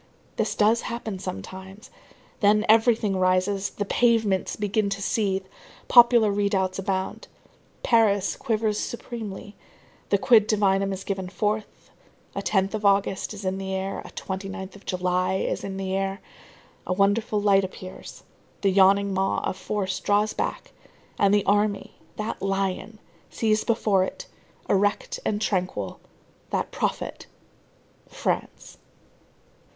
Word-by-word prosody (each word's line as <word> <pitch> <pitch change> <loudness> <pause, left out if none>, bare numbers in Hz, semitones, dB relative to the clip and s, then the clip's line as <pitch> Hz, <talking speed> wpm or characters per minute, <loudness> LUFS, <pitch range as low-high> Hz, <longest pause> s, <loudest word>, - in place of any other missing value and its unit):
This - - -1
does 220 +2 +3
happen 225 -5 -5
sometimes. 190 - -8 0.5
Then 210 0 +4
everything 220 -2 +4
rises, 185 +2 +1
the 205 - -4
pavements 220 -4 +2
begin 210 0 0
to 195 0 -3
seethe, 195 -1 0 0.4
popular 235 -3 +7
redoubts 195 -2 0
abound. 190 0 -3 0.6
Paris 210 -4 +3
quivers 215 -2 -1
supremely, 215 -4 -6 0.5
the 200 - +4
quid 215 0 +5
divinum 195 -2 +2
is 190 0 -5
given 190 -2 -3
forth, 210 +2 -3 0.4
a - - -2
10th 195 -1 +1
of 215 -1 -3
August 200 -1 +2
is 205 -2 -7
in 190 +1 -1
the 190 0 -3
air, 190 +1 -3
a - - -10
29th 190 0 -6
of 205 - -16
July 185 0 0
is - - -2
in 195 -1 -5
the 190 -1 -2
air, 195 0 -2 0.7
a - - +1
wonderful 205 +2 +2
light 200 -1 +4
appears, 185 0 -9 0.4
the 195 - +3
yawning 195 +1 +4
maw 190 0 +1
of - - -2
force 190 0 -3
draws 205 +1 +1
back, - - -3 0.5
and 200 -1 +4
the 205 -1 +3
army, 205 0 +1 0.2
that 215 +1 -4
lion, 195 +2 -2 0.3
sees 215 -1 +1
before 215 -5 +2
it, - - -5 0.4
erect 205 +1 +1
and 210 0 -1
tranquil, 180 - -2 0.5
that - - -2
prophet, - - -3 0.8
France. - - -4
200 Hz, 130 wpm, -25 LUFS, 190-215 Hz, 0.8 s, popular